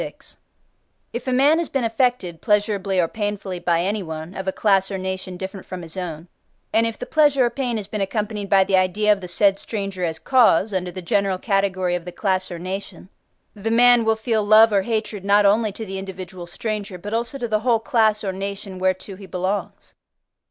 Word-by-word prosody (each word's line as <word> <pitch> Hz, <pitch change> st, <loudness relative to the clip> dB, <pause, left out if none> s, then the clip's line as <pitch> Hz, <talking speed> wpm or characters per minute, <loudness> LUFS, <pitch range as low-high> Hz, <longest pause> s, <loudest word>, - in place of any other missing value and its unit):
XLVI. -, -, -9 dB, 0.8 s
If 240 Hz, +2 st, -5 dB
a -, -, +1 dB
man 280 Hz, +6 st, +4 dB
has 340 Hz, -, -2 dB
been 270 Hz, -3 st, -1 dB
affected 225 Hz, -7 st, 0 dB
pleasurably 205 Hz, -2 st, +1 dB
or 170 Hz, -, +3 dB
painfully 205 Hz, -2 st, -4 dB
by 170 Hz, -1 st, +1 dB
anyone, 175 Hz, -4 st, -4 dB
of 190 Hz, 0 st, -6 dB
a -, -, +2 dB
class 195 Hz, -1 st, +2 dB
or 195 Hz, -, -3 dB
nation 190 Hz, -1 st, -4 dB
different 190 Hz, +1 st, -6 dB
from 180 Hz, -1 st, -7 dB
his 165 Hz, +1 st, -8 dB
own, 170 Hz, -3 st, -5 dB, 0.5 s
and 225 Hz, +1 st, +4 dB
if 230 Hz, -, -5 dB
the -, -, -6 dB
pleasure 290 Hz, -4 st, +3 dB
or 240 Hz, -, 0 dB
pain 250 Hz, -4 st, -2 dB
has 210 Hz, -, -4 dB
been 210 Hz, +1 st, -4 dB
accompanied 210 Hz, 0 st, -3 dB
by 195 Hz, -1 st, +5 dB
the 190 Hz, -, +1 dB
idea 190 Hz, +3 st, +2 dB
of 200 Hz, -, -6 dB
the 180 Hz, -, -6 dB
said 195 Hz, +2 st, +2 dB
stranger 195 Hz, -4 st, -4 dB
as 165 Hz, -2 st, -1 dB
cause, 215 Hz, +1 st, +3 dB
under 185 Hz, -1 st, -1 dB
the 185 Hz, 0 st, -8 dB
general 195 Hz, +2 st, +1 dB
category 190 Hz, -3 st, 0 dB
of 175 Hz, -1 st, -3 dB
the 180 Hz, -, -6 dB
class 185 Hz, -1 st, -1 dB
or 175 Hz, -, -6 dB
nation: 185 Hz, 0 st, -6 dB, 0.4 s
the 210 Hz, +1 st, -4 dB
man 240 Hz, +1 st, +6 dB
will 220 Hz, 0 st, +2 dB
feel 220 Hz, -1 st, 0 dB
love 215 Hz, +1 st, +6 dB
or 200 Hz, -, +4 dB
hatred, 215 Hz, -1 st, -3 dB
not 200 Hz, +1 st, +4 dB
only 215 Hz, +2 st, +3 dB
to 220 Hz, +3 st, -7 dB
the 195 Hz, -1 st, -5 dB
individual 185 Hz, -2 st, -8 dB
stranger, 205 Hz, +1 st, -4 dB
but 205 Hz, +4 st, -7 dB
also 235 Hz, +4 st, -2 dB
to 245 Hz, -3 st, -3 dB
the 215 Hz, -1 st, +1 dB
whole 235 Hz, 0 st, +2 dB
class 220 Hz, -4 st, +2 dB
or 190 Hz, -2 st, -2 dB
nation 195 Hz, 0 st, -6 dB
whereto 185 Hz, +1 st, -1 dB
he 195 Hz, 0 st, -12 dB
belongs. 185 Hz, +3 st, -4 dB
200 Hz, 210 wpm, -22 LUFS, 185-220 Hz, 0.8 s, man